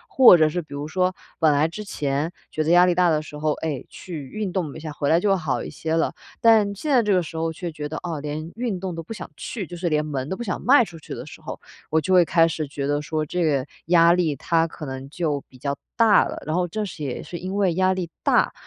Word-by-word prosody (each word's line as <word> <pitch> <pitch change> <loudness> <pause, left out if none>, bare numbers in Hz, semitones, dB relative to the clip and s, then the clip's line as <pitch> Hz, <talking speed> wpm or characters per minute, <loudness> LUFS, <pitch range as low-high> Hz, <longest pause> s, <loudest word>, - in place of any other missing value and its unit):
或 245 -9 +9
者 155 - +5
是 175 +3 -2
比 150 -3 -10
如 145 +1 -4
说， 185 +3 +1 0.3
本 160 -2 +5
来 145 +2 +3
之 190 +6 -7
前 150 -4 -2 0.2
觉 155 - -1
得 155 - -1
压 175 +1 +7
力 180 - +3
大 180 0 +3
的 155 -1 +2
时 150 - -10
候， 150 0 0
哎， 150 -5 -4
去 155 -7 -8
运 205 0 -4
动 170 -7 -2
一 - - -7
下， 155 -1 -6
回 145 -1 -2
来 165 - +5
就 205 - +1
会 - - +5
好 140 -9 -2
一 - - -7
些 160 0 -2
了。 165 - +1 0.3
但 215 -3 +4
现 295 +9 -3
在 255 -3 +5
这 210 -2 0
个 180 -2 +3
时 165 - -9
候 165 0 -1
却 170 +1 -5
觉 150 -1 -6
得， 160 - -4
哦， 165 -4 -3
连 150 +3 -5
运 230 -5 -2
动 185 -1 -4
都 165 - -5
不 165 - -13
想 225 - -6
去， 210 -7 -5
就 175 - -9
是 175 0 -1
连 150 -1 +1
门 140 -2 -3
都 190 - -3
不 240 - -4
想 185 -5 -3
迈 255 -1 +5
出 170 -4 -11
去 - - -8
的 - - -7
时 - - -12
候， - - -7 0.3
我 160 - +3
就 175 +5 0
会 180 -1 +7
开 165 0 +4
始 160 -2 -3
觉 140 0 -4
得 145 +1 0
说 155 +1 -2
这 175 +3 -1
个 140 -4 +1 0.2
压 170 -1 +6
力， 170 -5 +1
它 165 +4 +1
可 160 -1 -9
能 130 0 -6
就 150 -3 -1
比 130 - -16
较 140 +2 -2 0.2
大 225 -3 +6
了， - - -6
然 155 - -1
后 180 0 +1
正 210 +5 -3
是 170 -5 -7
也 135 -3 -4
是 175 - -7
因 185 +2 -4
为 195 -4 +2
压 185 +2 +2
力 175 -3 -4
大， - - +3
165 Hz, 300 characters per minute, -23 LUFS, 150-185 Hz, 0.3 s, 或